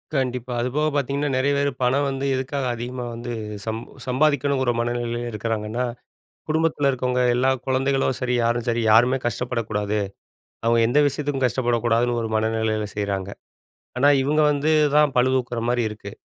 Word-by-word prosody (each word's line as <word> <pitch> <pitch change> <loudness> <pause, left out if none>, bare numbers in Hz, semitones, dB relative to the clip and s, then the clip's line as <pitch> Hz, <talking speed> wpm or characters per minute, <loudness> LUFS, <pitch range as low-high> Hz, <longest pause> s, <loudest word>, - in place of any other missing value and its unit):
கண்டிப்பா, 125 -2 -1
அதுபோக 145 +5 0
பாத்தீங்கன்னா, 140 +1 0
நெறைய 140 +2 +2
பேரு 140 0 +1
பணம் 140 +3 +2
வந்து 135 0 -3
எதுக்காக 135 +1 -2
அதிகமா 125 +1 -5
வந்து 120 +1 -5 0.3
சம் 110 0 -2 0.3
சம்பாதிக்கணுங்கிற 140 -1 +2
மனநிலையில 120 0 -2
இருக்கிறாங்கன்னா, 110 +2 -2 0.6
குடும்பத்தில 155 -2 +1
இருக்கவங்க, 125 -1 -1
எல்லா 130 +2 +2 0.2
கொழந்தைகளும் 135 0 +1
சரி, 125 -1 0
யாரும் 120 0 0
சரி, 120 0 +1
யாருமே 120 +4 +5
கஷ்டப்படக்கூடாது. 110 -3 -2 0.7
அவுங்க 115 0 +3
எந்த 140 +5 +3
விஷயத்துக்கும் 140 -2 -1
கஷ்டப்படக்கூடாதுன்னு 120 0 +1
ஒரு 110 - -3
மனநிலையில 110 -1 0
செய்றாங்க. 100 -2 -2 0.7
ஆனா 140 +3 +4
இவுங்க 150 +3 +2
வந்து 145 +2 0 0.3
தான் 150 -2 +5
பழுதூக்குற 125 -1 +1
மாரி 120 0 +1
இருக்கு. 105 -1 -9
125 Hz, 135 wpm, -23 LUFS, 115-135 Hz, 0.7 s, யாருமே